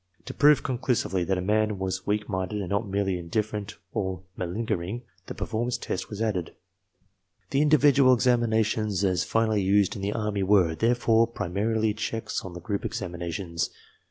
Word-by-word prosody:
To -, -, -6 dB
prove 150 Hz, 0 st, +5 dB
conclusively 125 Hz, -8 st, 0 dB
that 95 Hz, +1 st, 0 dB
a -, -, -1 dB
man 105 Hz, +1 st, +1 dB
was 95 Hz, 0 st, -3 dB
weak 105 Hz, 0 st, 0 dB
minded 95 Hz, +1 st, -2 dB
and 95 Hz, -, -5 dB
not 100 Hz, +2 st, 0 dB
merely 95 Hz, -2 st, 0 dB
indifferent 105 Hz, +4 st, -3 dB, 0.2 s
or 95 Hz, -1 st, -2 dB
malingering, 100 Hz, +3 st, -3 dB, 0.2 s
the -, -, -6 dB
per -, -, -3 dB
formance 120 Hz, +2 st, -2 dB
test 95 Hz, -, -4 dB
was 105 Hz, +1 st, -3 dB
added. 95 Hz, -7 st, -2 dB, 1.0 s
The 135 Hz, -, +3 dB
individual 145 Hz, -3 st, +5 dB
examinations 110 Hz, -4 st, +1 dB
as 90 Hz, -4 st, +2 dB
finally 110 Hz, -2 st, +1 dB
used 100 Hz, 0 st, +3 dB
in 100 Hz, -, -6 dB
the 100 Hz, +1 st, -1 dB
Army 105 Hz, -3 st, -1 dB
were, 95 Hz, -4 st, +4 dB
therefore, 115 Hz, +3 st, +3 dB
primarily 110 Hz, +1 st, -1 dB
checks 110 Hz, +1 st, -3 dB
on 95 Hz, -, -8 dB
the 90 Hz, -, -7 dB
group 100 Hz, +3 st, -3 dB
examinations. 85 Hz, -5 st, -3 dB
105 Hz, 160 wpm, -26 LUFS, 95-115 Hz, 1.0 s, prove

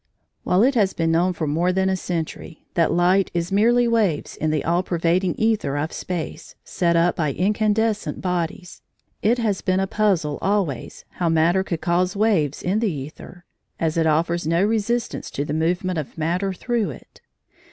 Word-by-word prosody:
While 185 Hz, +4 st, +3 dB
it 270 Hz, +3 st, +4 dB
has 205 Hz, -6 st, +2 dB
been 165 Hz, -1 st, 0 dB
known 175 Hz, +3 st, +2 dB
for 165 Hz, -2 st, -3 dB
more 165 Hz, +5 st, +1 dB
than 190 Hz, +1 st, +1 dB
a 190 Hz, -, +1 dB
century 170 Hz, -2 st, -5 dB
that 165 Hz, -2 st, +2 dB
light 180 Hz, +3 st, +3 dB
is 170 Hz, +2 st, -1 dB
merely 235 Hz, +4 st, +4 dB
waves 215 Hz, -10 st, 0 dB
in 155 Hz, -, -1 dB
the 155 Hz, -1 st, -1 dB
all 170 Hz, +2 st, +2 dB
pervading 175 Hz, 0 st, 0 dB
æther 220 Hz, -10 st, 0 dB
of 155 Hz, +3 st, -3 dB
space, 175 Hz, -4 st, -5 dB
set 170 Hz, -3 st, 0 dB
up 170 Hz, +1 st, +3 dB
by 150 Hz, -4 st, -1 dB
incandescent 210 Hz, +4 st, 0 dB
bodies, 180 Hz, -1 st, -3 dB, 0.4 s
it 230 Hz, +4 st, +3 dB
has 215 Hz, -5 st, -1 dB
been 185 Hz, -1 st, +1 dB
a 195 Hz, -, +1 dB
puzzle 190 Hz, -8 st, 0 dB
always 190 Hz, -, -2 dB
how 175 Hz, -2 st, +1 dB
matter 165 Hz, +4 st, +3 dB
could 170 Hz, -4 st, -4 dB
cause 180 Hz, +3 st, +1 dB
waves 200 Hz, -10 st, +1 dB
in 190 Hz, +4 st, +1 dB
the 155 Hz, -10 st, -2 dB
æther, 175 Hz, +2 st, -13 dB, 0.4 s
as 160 Hz, -1 st, 0 dB
it 165 Hz, -1 st, +2 dB
offers 165 Hz, +1 st, +1 dB
no 170 Hz, +3 st, +2 dB
resistance 225 Hz, +2 st, -1 dB
to 145 Hz, -, -3 dB
the 145 Hz, -, -3 dB
movement 175 Hz, +3 st, 0 dB
of 150 Hz, -, -7 dB
matter 175 Hz, +5 st, -1 dB
through 230 Hz, +3 st, -1 dB
it. -, -, -12 dB
180 Hz, 180 wpm, -22 LUFS, 165-200 Hz, 0.4 s, it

